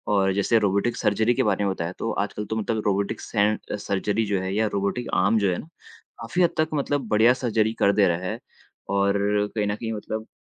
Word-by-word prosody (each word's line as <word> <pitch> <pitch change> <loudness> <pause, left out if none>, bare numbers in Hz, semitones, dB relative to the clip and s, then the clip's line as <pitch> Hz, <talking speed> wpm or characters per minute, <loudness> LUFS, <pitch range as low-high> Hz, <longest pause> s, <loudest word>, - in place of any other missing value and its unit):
और 95 -1 +2
जैसे 100 +4 +2
robotic 105 +4 0
surgery 110 +3 +2
के - - +1
बारे 105 -2 +1
में 95 - +1
बताया 85 -1 -4
तो 115 - -2
आजकल 105 +1 -5
तो 110 +2 -4
मतलब 110 0 -1
रोबोटिक 100 -1 0
सेंज 105 0 +1 0.2
सर्जरी 100 +3 -1
जो 100 -2 0
है 95 +1 -3
या 110 0 +2
रोबोटिक 100 +5 -1
आर्म 115 - +3
जो 100 -2 +2
हैं, 90 - -2
काफ़ी 165 -1 -5
हद 170 - +4
तक 155 0 +2
मतलब 145 -3 -1
बढ़िया 110 +3 +5
सर्जरी 110 -4 0
कर 100 - +4
दे 100 -2 +4
रहा 85 -1 +1
है - - -4 0.5
और 100 0 +2 0.4
कहीं 105 -1 0
न 105 - -1
कहीं 115 +1 -5
मतलब 110 +1 -5
105 Hz, 215 wpm, -24 LUFS, 100-115 Hz, 0.5 s, बढ़िया